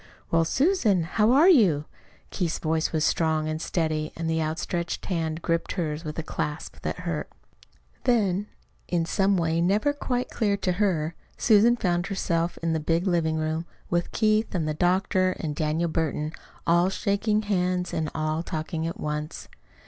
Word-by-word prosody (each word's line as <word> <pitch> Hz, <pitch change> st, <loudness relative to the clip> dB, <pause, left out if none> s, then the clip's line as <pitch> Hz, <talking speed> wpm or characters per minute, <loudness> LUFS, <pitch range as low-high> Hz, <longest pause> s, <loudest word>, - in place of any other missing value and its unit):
"Well, 165 Hz, 0 st, +3 dB
Susan, 245 Hz, -, +2 dB
how 210 Hz, +7 st, +2 dB
are 290 Hz, +7 st, +6 dB
you?" 195 Hz, -, +5 dB, 0.5 s
Keith's 170 Hz, -4 st, -1 dB
voice 160 Hz, 0 st, 0 dB
was 155 Hz, -2 st, +1 dB
strong 160 Hz, -2 st, +1 dB
and 155 Hz, 0 st, -3 dB
steady, 155 Hz, -3 st, -1 dB
and 165 Hz, 0 st, -3 dB
the 160 Hz, 0 st, +1 dB
outstretched 170 Hz, +2 st, -3 dB
hand 165 Hz, -3 st, -2 dB
gripped 165 Hz, 0 st, 0 dB
hers 160 Hz, -3 st, -2 dB
with 150 Hz, -2 st, -6 dB
a 165 Hz, -, -2 dB
clasp 150 Hz, -1 st, -4 dB
that -, -, -4 dB
hurt. 170 Hz, -4 st, -3 dB, 0.8 s
Then, 205 Hz, -5 st, +2 dB, 0.4 s
in 170 Hz, -2 st, 0 dB
some 195 Hz, +2 st, +2 dB
way 165 Hz, -1 st, +1 dB
never 210 Hz, +11 st, +2 dB
quite 250 Hz, -3 st, -2 dB
clear 205 Hz, -3 st, +1 dB
to 190 Hz, -2 st, 0 dB
her, 175 Hz, -4 st, 0 dB, 0.2 s
Susan 225 Hz, +1 st, +5 dB
found 175 Hz, -3 st, 0 dB
herself 170 Hz, -3 st, -1 dB
in 165 Hz, -1 st, +1 dB
the 160 Hz, -, 0 dB
big 165 Hz, +3 st, 0 dB
living 170 Hz, -4 st, +1 dB
room 160 Hz, +1 st, -2 dB, 0.2 s
with 175 Hz, 0 st, 0 dB
Keith 215 Hz, -1 st, +1 dB
and 160 Hz, -3 st, 0 dB
the 155 Hz, -, 0 dB
doctor 185 Hz, +2 st, +2 dB
and 150 Hz, -3 st, -3 dB
Daniel 155 Hz, +3 st, 0 dB
Burton, 155 Hz, -1 st, -1 dB, 0.3 s
all 175 Hz, +2 st, +4 dB
shaking 210 Hz, +2 st, 0 dB
hands 180 Hz, -3 st, 0 dB
and 155 Hz, -1 st, -1 dB
all 155 Hz, +1 st, -1 dB
talking 160 Hz, 0 st, -3 dB
at 165 Hz, -, -5 dB
once. 150 Hz, +1 st, -4 dB
170 Hz, 165 wpm, -26 LUFS, 160-195 Hz, 0.8 s, are